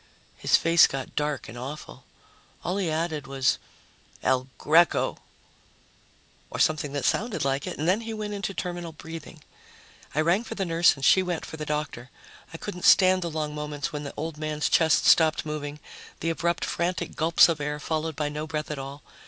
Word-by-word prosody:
His -, -, +3 dB
face 165 Hz, 0 st, +6 dB
got 135 Hz, -1 st, -6 dB
dark 150 Hz, 0 st, -2 dB
and 110 Hz, -, -9 dB
awful. 135 Hz, +5 st, -8 dB, 0.6 s
All 180 Hz, +3 st, -1 dB
he 190 Hz, -4 st, 0 dB
added 155 Hz, -3 st, -2 dB
was, 135 Hz, -1 st, +1 dB, 0.6 s
"El 130 Hz, 0 st, +1 dB
Greco," 165 Hz, +3 st, +3 dB, 1.3 s
or -, -, -6 dB
something 150 Hz, -2 st, +1 dB
that 145 Hz, -, -2 dB
sounded 220 Hz, -, 0 dB
like 135 Hz, 0 st, -1 dB
it, -, -, -5 dB
and 155 Hz, -, -2 dB
then 190 Hz, +5 st, +3 dB
he 225 Hz, 0 st, -6 dB
went 215 Hz, -1 st, -4 dB
into 200 Hz, -1 st, -3 dB
terminal 175 Hz, -3 st, -5 dB
breathing. 160 Hz, 0 st, -10 dB, 0.7 s
I 155 Hz, -, +3 dB
rang 175 Hz, +7 st, +2 dB
for 225 Hz, -, -7 dB
the 195 Hz, -, -1 dB
nurse 170 Hz, 0 st, +4 dB
and 135 Hz, -1 st, -3 dB
she 190 Hz, -, +6 dB
went 180 Hz, -3 st, -3 dB
for 160 Hz, -, -8 dB
the 150 Hz, -1 st, -6 dB
doctor. 150 Hz, -5 st, -3 dB, 0.4 s
I 165 Hz, -, -7 dB
couldn't 180 Hz, 0 st, -7 dB
stand 185 Hz, -1 st, +6 dB
the 170 Hz, -, -2 dB
long 155 Hz, -1 st, -3 dB
moments 150 Hz, +1 st, -4 dB
when 150 Hz, -, -3 dB
the 140 Hz, -, -6 dB
old 160 Hz, -1 st, -4 dB
man's 155 Hz, -1 st, -1 dB
chest 160 Hz, -3 st, +4 dB
stopped 160 Hz, -2 st, +5 dB
moving, 150 Hz, -1 st, -5 dB, 0.4 s
the 165 Hz, -, 0 dB
abrupt 170 Hz, +1 st, -1 dB
frantic 175 Hz, +1 st, -2 dB
gulps 165 Hz, +1 st, +5 dB
of 165 Hz, -3 st, -1 dB
air 150 Hz, +1 st, -2 dB
followed 160 Hz, 0 st, -2 dB
by 150 Hz, 0 st, -1 dB
no 150 Hz, +1 st, -4 dB
breath 155 Hz, -1 st, -4 dB
at 150 Hz, -, -4 dB
all. 140 Hz, +2 st, -8 dB
155 Hz, 190 wpm, -26 LUFS, 150-170 Hz, 1.3 s, face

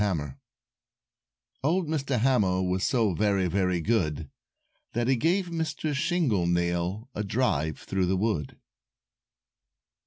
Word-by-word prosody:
HAMMER 75 Hz, -9 st, -2 dB, 1.2 s
Old 170 Hz, +4 st, +1 dB
Mr. 140 Hz, -4 st, -1 dB
Hammer 100 Hz, -8 st, +2 dB
Was 90 Hz, +1 st, -1 dB
so 115 Hz, -7 st, +2 dB
very, 100 Hz, 0 st, +1 dB
very 90 Hz, 0 st, +1 dB
good, 80 Hz, -8 st, 0 dB, 0.6 s
That 120 Hz, +1 st, 0 dB
he 135 Hz, -, +4 dB
gave 175 Hz, +8 st, +1 dB
Mr. 160 Hz, -2 st, -2 dB
Shingle 140 Hz, -, +1 dB
Nail 85 Hz, +5 st, -1 dB
A 105 Hz, -, -3 dB
drive 95 Hz, -, 0 dB
through 95 Hz, -2 st, -1 dB
the 95 Hz, +1 st, +1 dB
wood. 95 Hz, -8 st, -2 dB
105 Hz, 120 wpm, -27 LUFS, 90-135 Hz, 1.2 s, he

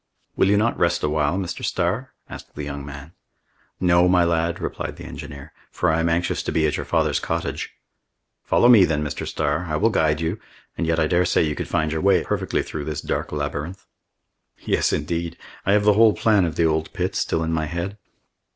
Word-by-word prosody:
"Will -, -, +3 dB
you 100 Hz, -, +4 dB
not 115 Hz, +3 st, +1 dB
rest 85 Hz, 0 st, +1 dB
a 75 Hz, -, +1 dB
while, 75 Hz, +3 st, +1 dB
Mr. 95 Hz, -3 st, -4 dB
Starr?" -, -, -1 dB, 0.2 s
asked -, -, -11 dB
the 75 Hz, -, -5 dB
young 70 Hz, -1 st, -5 dB
man. 70 Hz, +2 st, -9 dB, 0.7 s
"No, 90 Hz, -1 st, +4 dB
my 90 Hz, -1 st, +4 dB
lad," 85 Hz, 0 st, 0 dB
replied -, -, -4 dB
the -, -, -11 dB
engineer, 70 Hz, +1 st, -9 dB, 0.2 s
"for -, -, 0 dB
I 80 Hz, -, +1 dB
am 85 Hz, 0 st, +1 dB
anxious 85 Hz, +1 st, 0 dB
to -, -, -3 dB
be 80 Hz, -, +2 dB
at 75 Hz, -, +1 dB
your -, -, -5 dB
father's -, -, +1 dB
cottage." 85 Hz, +1 st, -3 dB, 0.7 s
"Follow 120 Hz, -, +3 dB
me 115 Hz, -6 st, +8 dB
then, 75 Hz, -3 st, +1 dB
Mr. 75 Hz, -, -4 dB
Starr. 75 Hz, +3 st, -1 dB
I 75 Hz, -, -1 dB
will 110 Hz, +8 st, +2 dB
guide 75 Hz, -6 st, +2 dB
you, 80 Hz, 0 st, -2 dB, 0.4 s
and 85 Hz, -, -2 dB
yet 80 Hz, 0 st, +1 dB
I 80 Hz, -, +3 dB
daresay 90 Hz, +2 st, +2 dB
you 75 Hz, -1 st, 0 dB
could -, -, -5 dB
find 80 Hz, 0 st, 0 dB
your 80 Hz, 0 st, -2 dB
way 95 Hz, -3 st, +4 dB
perfectly -, -, -1 dB
well -, -, -9 dB
through 75 Hz, -2 st, -5 dB
this 75 Hz, -1 st, -4 dB
dark -, -, -3 dB
labyrinth." 75 Hz, +5 st, -4 dB, 0.8 s
"Yes, -, -, +1 dB
indeed! 85 Hz, +3 st, -2 dB, 0.3 s
I 100 Hz, -, +4 dB
have 105 Hz, 0 st, +3 dB
the 105 Hz, 0 st, +5 dB
whole 110 Hz, 0 st, +5 dB
plan 105 Hz, -5 st, +3 dB
of 80 Hz, -, -3 dB
the 85 Hz, -, +2 dB
old 80 Hz, 0 st, 0 dB
pit -, -, -2 dB
still 80 Hz, -, 0 dB
in 80 Hz, 0 st, -1 dB
my 80 Hz, -1 st, -1 dB
head." 85 Hz, +6 st, -4 dB
80 Hz, 215 wpm, -23 LUFS, 75-90 Hz, 0.8 s, me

